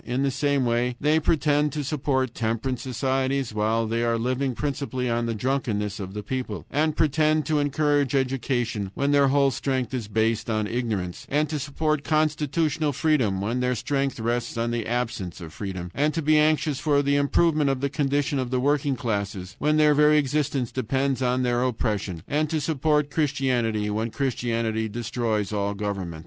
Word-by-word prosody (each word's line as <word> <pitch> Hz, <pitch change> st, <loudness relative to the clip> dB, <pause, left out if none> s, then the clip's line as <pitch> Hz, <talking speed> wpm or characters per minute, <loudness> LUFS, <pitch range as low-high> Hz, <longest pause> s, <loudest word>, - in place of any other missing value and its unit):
In 125 Hz, +3 st, -1 dB
the 140 Hz, -, +1 dB
same 140 Hz, -1 st, +1 dB
way 120 Hz, +1 st, +1 dB
they 150 Hz, +2 st, +3 dB
pretend 150 Hz, -2 st, +2 dB
to 150 Hz, -, -2 dB
support 130 Hz, -3 st, -1 dB
temperance 115 Hz, +2 st, -2 dB
societies, 130 Hz, 0 st, -1 dB
while 110 Hz, +2 st, +1 dB
they 115 Hz, +1 st, -1 dB
are 115 Hz, -1 st, +1 dB
living 130 Hz, +2 st, -1 dB
principally 135 Hz, -3 st, -2 dB
on 115 Hz, 0 st, 0 dB
the 115 Hz, -, -2 dB
drunkenness 110 Hz, -4 st, -1 dB
of 95 Hz, 0 st, -6 dB
the 105 Hz, -, -4 dB
people; 130 Hz, +4 st, -4 dB
and 155 Hz, +1 st, +1 dB
pretend 155 Hz, 0 st, +2 dB
to 150 Hz, 0 st, +1 dB
encourage 145 Hz, -1 st, +1 dB
education, 120 Hz, -5 st, -1 dB
when 140 Hz, 0 st, +1 dB
their 140 Hz, -1 st, +5 dB
whole 140 Hz, 0 st, +3 dB
strength 130 Hz, -2 st, -2 dB
is 120 Hz, -5 st, -3 dB
based 110 Hz, +1 st, 0 dB
on 110 Hz, -1 st, 0 dB
ignorance; 105 Hz, -6 st, -3 dB
and 150 Hz, +2 st, +1 dB
to 155 Hz, -2 st, -2 dB
support 150 Hz, +2 st, -1 dB
constitutional 155 Hz, 0 st, +1 dB
freedom, 125 Hz, -, +1 dB
when 115 Hz, +5 st, -1 dB
their 125 Hz, 0 st, +1 dB
strength 135 Hz, +3 st, -1 dB
rests 120 Hz, +1 st, -2 dB
on 115 Hz, 0 st, 0 dB
the 120 Hz, -2 st, -2 dB
absence 115 Hz, -7 st, -3 dB
of 80 Hz, -3 st, -9 dB
freedom; 95 Hz, -3 st, -5 dB
and 150 Hz, +3 st, +1 dB
to 165 Hz, -, -1 dB
be 155 Hz, +1 st, +4 dB
anxious 150 Hz, -2 st, +2 dB
for 145 Hz, -2 st, +2 dB
the 140 Hz, 0 st, +2 dB
improvement 150 Hz, +1 st, +2 dB
of 135 Hz, -1 st, 0 dB
the 140 Hz, -, 0 dB
condition 140 Hz, 0 st, 0 dB
of 130 Hz, -2 st, -2 dB
the 130 Hz, 0 st, 0 dB
working 145 Hz, +1 st, +1 dB
classes, 100 Hz, -5 st, -3 dB
when 150 Hz, +2 st, +2 dB
their 150 Hz, -1 st, +5 dB
very 150 Hz, +1 st, +5 dB
existence 140 Hz, -3 st, 0 dB
depends 130 Hz, +1 st, -1 dB
on 125 Hz, 0 st, +1 dB
their 120 Hz, -1 st, +1 dB
oppression; 105 Hz, -8 st, -2 dB
and 150 Hz, +1 st, 0 dB
to 160 Hz, -, 0 dB
support 150 Hz, 0 st, +1 dB
Christianity, 130 Hz, -8 st, 0 dB
when 110 Hz, +2 st, -1 dB
Christianity 115 Hz, -4 st, -1 dB
destroys 110 Hz, -2 st, -2 dB
all 100 Hz, 0 st, -1 dB
government. 100 Hz, -5 st, -4 dB
130 Hz, 180 wpm, -25 LUFS, 115-145 Hz, -, their